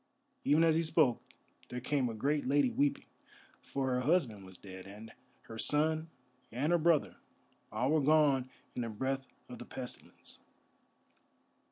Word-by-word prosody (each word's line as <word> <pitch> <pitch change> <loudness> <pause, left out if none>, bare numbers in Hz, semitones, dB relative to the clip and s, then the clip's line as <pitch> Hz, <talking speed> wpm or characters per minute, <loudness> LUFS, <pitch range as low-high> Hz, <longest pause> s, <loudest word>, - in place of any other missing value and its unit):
Even 155 +3 +4
as 165 -1 +4
he 165 - +3
spoke 155 -7 +2 0.5
there 125 - -4
came 130 0 0
a 115 - -5
great 145 +5 0
lady 140 -2 +3
weeping, 145 0 0 0.6
for 135 -2 -2
her 125 - +1
husband 125 - +1
was 95 -1 -13
dead, 95 0 -10
and 105 +3 -10 0.3
her 115 0 -9
son 155 +4 +2 0.4
and 135 +8 0
her 175 - +4
brother, 155 - +2 0.5
all 125 +6 0
were 155 -1 +3
gone 140 -3 +3 0.2
in - - -3
the 115 - -3
breath 135 +4 -2 0.2
of 125 - -9
the 120 - -8
pestilence. 125 -1 -8
135 Hz, 155 wpm, -33 LUFS, 115-150 Hz, 0.6 s, Even